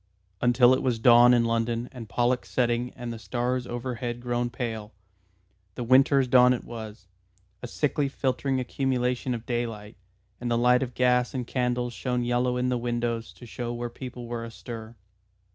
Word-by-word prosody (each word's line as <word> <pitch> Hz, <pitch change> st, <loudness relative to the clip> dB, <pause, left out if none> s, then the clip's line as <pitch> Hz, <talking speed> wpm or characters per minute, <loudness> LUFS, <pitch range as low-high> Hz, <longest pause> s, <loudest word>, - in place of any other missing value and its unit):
Until 120 Hz, +1 st, +5 dB
it 130 Hz, -, +1 dB
was 125 Hz, -3 st, 0 dB
dawn 120 Hz, +1 st, +7 dB
in 120 Hz, -1 st, +4 dB
London 115 Hz, +1 st, -1 dB
and 115 Hz, -4 st, -9 dB
Pollux 125 Hz, +3 st, 0 dB
setting 120 Hz, 0 st, 0 dB
and 120 Hz, -1 st, -5 dB
the 115 Hz, -, -8 dB
stars 125 Hz, +4 st, -2 dB
overhead 120 Hz, 0 st, -4 dB
grown 120 Hz, 0 st, -1 dB
pale. 115 Hz, -3 st, -5 dB, 0.8 s
The 125 Hz, -, -4 dB
Winter's 130 Hz, +2 st, +4 dB
dawn 125 Hz, 0 st, +6 dB
it 125 Hz, -, -4 dB
was, 110 Hz, -4 st, -9 dB, 0.5 s
a 125 Hz, -, -5 dB
sickly 145 Hz, +2 st, 0 dB
filtering 130 Hz, 0 st, -1 dB
accumulation 125 Hz, -1 st, -1 dB
of 115 Hz, 0 st, -8 dB
daylight, 115 Hz, -3 st, -4 dB, 0.4 s
and 120 Hz, -, -3 dB
the 120 Hz, -, +2 dB
light 125 Hz, +1 st, +4 dB
of 125 Hz, -2 st, -4 dB
gas 125 Hz, 0 st, +2 dB
and 125 Hz, -2 st, -2 dB
candles 125 Hz, -1 st, -1 dB
shone 125 Hz, 0 st, -2 dB
yellow 125 Hz, +1 st, +1 dB
in 125 Hz, 0 st, 0 dB
the 125 Hz, -1 st, 0 dB
windows 120 Hz, -1 st, -2 dB
to 120 Hz, -, -13 dB
show 120 Hz, +1 st, -5 dB
where 120 Hz, 0 st, -4 dB
people 125 Hz, -1 st, -8 dB
were 120 Hz, 0 st, -4 dB
astir. 115 Hz, 0 st, -8 dB
120 Hz, 170 wpm, -26 LUFS, 120-125 Hz, 0.8 s, dawn